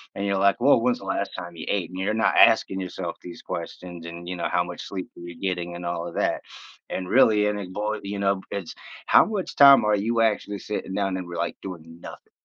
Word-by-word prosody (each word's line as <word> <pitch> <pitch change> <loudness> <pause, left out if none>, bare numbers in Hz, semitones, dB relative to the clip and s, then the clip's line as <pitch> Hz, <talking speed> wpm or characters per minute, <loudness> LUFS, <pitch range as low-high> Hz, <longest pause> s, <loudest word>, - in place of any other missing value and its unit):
And 100 - -3
you're 100 -1 +1
like, 100 +1 +3
"Woah. 125 -2 +5
When's 125 0 +1
the 95 - -11
last 95 +1 -2
time 85 -1 -7
you 80 - -7
ate?" 95 -4 -1
You're 95 +3 -1
not 110 - +2
asking 105 -4 +5
yourself 90 -2 -5
these 90 - -10
questions 90 -2 -7
and, 85 +1 -8
you 90 - -4
know, 85 - -2
"How 90 -1 +2
much 90 0 -8
sleep 95 +3 -6
were 85 - -10
you 85 -1 -10
getting," 90 -2 -3
and 85 0 -7
all 85 0 -3
of 85 - -9
that, - - 0 0.5
and 90 -1 -4
really 105 -5 +5
and 105 0 -1
it 95 -2 -7
boy, 105 +1 -2
you 100 0 -4
know, 100 -1 +1
it's 100 -5 -5 0.3
how - - +7
much 210 -4 -4
time 140 -5 +8
are 105 0 +3
you 115 +3 0
actually 105 -2 0
sitting 100 -2 -5
down 95 -2 -1
and 90 -1 -6
were, 85 - -7
like, - - -2
doing 85 -3 -9
nothing? - - -11
95 Hz, 240 wpm, -25 LUFS, 85-105 Hz, 0.5 s, time